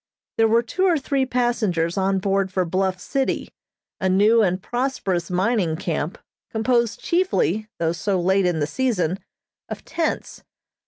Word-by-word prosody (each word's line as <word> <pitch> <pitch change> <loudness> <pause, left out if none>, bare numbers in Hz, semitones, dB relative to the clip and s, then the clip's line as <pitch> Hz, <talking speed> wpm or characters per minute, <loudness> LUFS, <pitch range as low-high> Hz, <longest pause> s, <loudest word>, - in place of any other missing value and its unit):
There 225 - +5
were 230 +2 +3
two 370 +11 -1
or 350 -3 +4
three 270 -1 0
passengers 215 -10 0
on 195 0 +1
board 195 0 0
for 185 -1 0
Bluff 185 +2 0
City, 270 +7 -2 0.5
a 190 - +1
new 210 +5 +5
and 185 -3 +1
prosperous 200 -7 -2
mining 185 -2 +1
camp, 165 +2 -3 0.3
composed 235 0 +1
chiefly, 280 - +1
though 165 -1 0
so 185 +3 -1
late 190 +1 +2
in 175 -3 0
the 145 - +1
season, 190 - -1 0.5
of - - -7
tents. 325 0 -3
195 Hz, 150 wpm, -22 LUFS, 180-240 Hz, 0.5 s, There